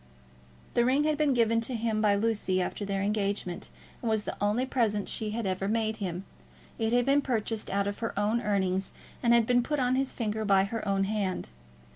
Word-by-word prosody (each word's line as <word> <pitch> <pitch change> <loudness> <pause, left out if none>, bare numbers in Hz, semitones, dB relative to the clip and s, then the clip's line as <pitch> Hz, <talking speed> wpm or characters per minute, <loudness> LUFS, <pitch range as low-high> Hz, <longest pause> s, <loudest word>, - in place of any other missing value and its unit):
The 240 - +3
ring 265 +4 +3
had 305 0 +2
been 295 -1 +2
given 230 -2 +3
to 240 +2 -3
him 220 -1 0
by 205 -2 +4
Lucy 205 -3 +1
after 185 +3 -2
their 195 -1 -1
engagement, 200 -3 -2 0.3
and 235 - -1
was 220 -1 +1
the - - -4
only 210 +5 +2
present 220 -6 0
she 215 - -2
had 225 +1 -3
ever 190 0 -1
made 220 0 0
him. 185 -1 -4 0.5
It 225 0 +1
had 245 0 +3
been 280 +1 +4
purchased 225 -4 -2
out 200 0 0
of 200 0 -3
her 225 -3 -3
own 215 +3 +1
earnings, 190 -3 0 0.3
and 235 - +3
had 235 -1 +5
been 245 +1 +3
put 295 +5 -2
on 250 -1 +2
his 265 0 0
finger 220 -2 -2
by 195 -2 +4
her 220 +3 -3
own 195 0 +2
hand. 195 - -2
215 Hz, 210 wpm, -29 LUFS, 200-235 Hz, 0.5 s, had